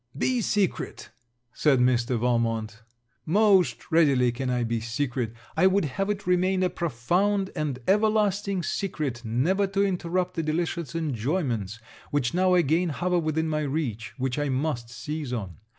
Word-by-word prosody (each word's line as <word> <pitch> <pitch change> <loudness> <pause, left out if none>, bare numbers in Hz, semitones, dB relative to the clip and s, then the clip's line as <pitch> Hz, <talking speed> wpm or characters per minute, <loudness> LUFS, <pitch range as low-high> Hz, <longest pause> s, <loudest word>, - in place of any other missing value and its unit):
'Be 250 - +1
secret,' 205 -3 -1 0.4
said 145 -4 +3
Mr. 125 0 +2
Valmont. 115 -2 -1 0.4
Most 185 - +3
readily 140 -7 +4
can 125 +2 -3
I 125 -1 0
be 115 0 -1
secret. 120 0 -2 0.2
I 185 +4 +5
would 190 -2 +2
have 195 +8 -2
it 205 -1 -2
remain 185 +1 +2
a 180 - +1
profound 180 - 0
and 150 -4 -2
everlasting 205 -2 +2
secret, 150 -11 -3
never 155 - +1
to 195 +1 +1
interrupt 180 -1 -1
the 165 - -1
delicious 165 0 -2
enjoyments 125 - -2 0.3
which 130 -5 0
now 185 +1 +3
again 170 +1 +2
hover 180 +4 0
within 160 0 -1
my 155 -1 -1
reach, 135 -7 -3
which 130 +1 -1
I 145 -1 0
must 130 -3 -2
seize 145 +3 -5
on. 95 -9 -4
155 Hz, 150 wpm, -26 LUFS, 125-185 Hz, 0.4 s, I